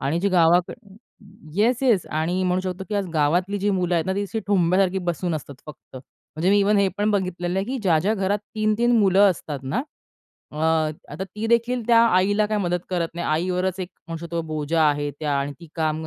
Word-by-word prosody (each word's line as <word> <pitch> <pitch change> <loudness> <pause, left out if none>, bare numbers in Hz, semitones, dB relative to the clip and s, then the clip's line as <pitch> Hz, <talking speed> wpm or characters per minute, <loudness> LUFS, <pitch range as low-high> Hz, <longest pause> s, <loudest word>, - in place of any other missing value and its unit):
आणि 150 +6 -1
जी 200 - +1
गावाक 175 -1 +3 0.8
येस-येस 235 -1 +2
आणि 165 +4 -1
म्हणू 180 0 +1
शकतो, 185 0 -5
की 210 - -3
आज 200 -2 0
गावातली 175 +7 +1
जी 205 +1 0
मुलं 180 -2 0
आहेत 165 -2 +1
ना, 190 - 0
ती 200 - -1
अशी 200 +3 -4
ठोंब्यासारखी 190 0 +2
बसून 175 -1 -2
असतात 145 -2 -6
फक्त. 150 -3 -12
म्हणजे 155 +6 -4
मी 205 - +5
इव्हन 205 +1 +3
हे 200 -1 +3
पण 210 +1 +1
बघितलेलं 185 -2 -1
आहे, 195 - -1
की 265 +1 -3
ज्या-ज्या 185 +3 +2
घरात 200 0 0 0.2
3-3 215 +2 +1
मुलं 200 0 +5
असतात 150 -4 -5
ना, 170 - -2 0.7
अ, - - -10 0.6
आता 170 +6 -4
तीदेखील 235 +5 0
त्या 230 -1 +6 0.2
आईला 205 +3 +2
काही 210 0 -1
मदत 175 0 -1
करत 175 -2 -1
नाही. 175 0 -4
आईवरच 180 +3 -1
एक 180 - -4 0.2
म्हणू 165 - -4
शकतो 170 0 -3
बोजा 155 +1 0
आहे 145 0 -1
त्या 145 +1 -4
आणि 140 +1 -3
ती 170 - -11
काम 160 0 -1
185 Hz, 200 wpm, -23 LUFS, 165-205 Hz, 0.8 s, त्या